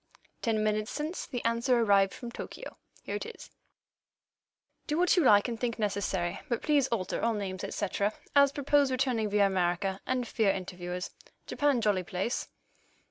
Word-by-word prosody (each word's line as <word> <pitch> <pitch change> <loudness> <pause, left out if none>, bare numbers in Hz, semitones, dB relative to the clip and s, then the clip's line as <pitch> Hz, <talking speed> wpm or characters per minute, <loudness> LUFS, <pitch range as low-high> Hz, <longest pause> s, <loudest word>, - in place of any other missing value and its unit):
Ten 220 -3 +1
minutes 215 +1 0
since 305 +6 -4
the 245 -5 -5
answer 235 +2 +2
arrived 200 -3 +4
from 240 -1 -8
Tokyo. - - -8 0.3
Here - - -3
it - - -6
is: 460 - -11 1.4
"Do 300 - 0
what 355 0 +4
you 355 - +4
like 205 -4 +6
and 230 -2 -4
think 235 -1 -2
necessary, 195 -5 -1
but 235 - -1
please 290 -3 +3
alter 210 -7 -2
all 230 0 +2
names, 190 -2 -4
et - - -4
cetera, 205 0 0 0.2
as 280 -1 +6
propose 285 0 +2
returning 255 -4 0
via 205 0 +4
America, 190 +1 0
and 255 -2 0
fear 220 -3 +1
interviewers. 180 -1 -4 0.3
Japan 285 -4 +1
jolly 205 -4 +2
place." 185 +6 -3
220 Hz, 165 wpm, -30 LUFS, 195-255 Hz, 1.4 s, like